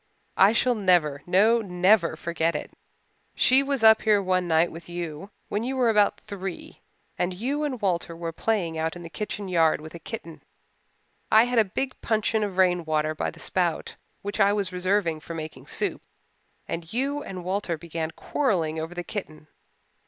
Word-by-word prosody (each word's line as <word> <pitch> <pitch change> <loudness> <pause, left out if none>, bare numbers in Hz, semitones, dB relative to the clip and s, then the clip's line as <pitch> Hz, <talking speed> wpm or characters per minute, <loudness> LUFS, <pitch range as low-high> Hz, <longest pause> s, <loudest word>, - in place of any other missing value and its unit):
"I 195 +2 +7
shall 245 +2 +2
never, 175 -9 +2
no 215 +6 +4
never, 180 -2 +3
forget 170 0 -1
it. 150 - -4 0.6
She 260 +2 +5
was 275 -3 -2
up 220 0 +7
here 210 -2 +4
one 185 -2 0
night 165 +1 +3
with 165 +1 -11
you 175 +1 -5 0.2
when 205 - -2
you 260 +2 -2
were 245 -3 +4
about 210 -2 +3
three, 195 -3 -7 0.4
and 180 +1 0
you 270 +9 -2
and 270 -5 -2
Walter 175 -4 -1
were 165 0 -4
playing 170 -4 -1
out 160 +1 -1
in 175 - -9
the 165 - -9
kitchen 210 0 -4
yard 165 -3 +3
with 155 +1 -10
a 170 - -8
kitten. 170 -2 -8 0.9
I 220 +1 +8
had 245 -1 +2
a - - +6 0.2
big 265 -1 -3
puncheon 220 -1 +1
of 195 -3 -4
rainwater 160 -4 +2
by 155 - -2
the 165 - -13
spout 175 -1 -1 0.3
which 205 +2 -4
I 200 0 +5
was 200 -3 -2
reserving 180 -3 0
for 165 +2 -8
making 155 -1 -7
soap. - - -2 0.7
And 165 0 -5
you 275 +5 -1
and 185 -9 -7
Walter 185 -2 -2
began 165 0 -4
quarrelling 165 - -1
over 165 +2 -5
the 175 - -4
kitten. 155 -7 -7
185 Hz, 180 wpm, -26 LUFS, 165-215 Hz, 0.9 s, I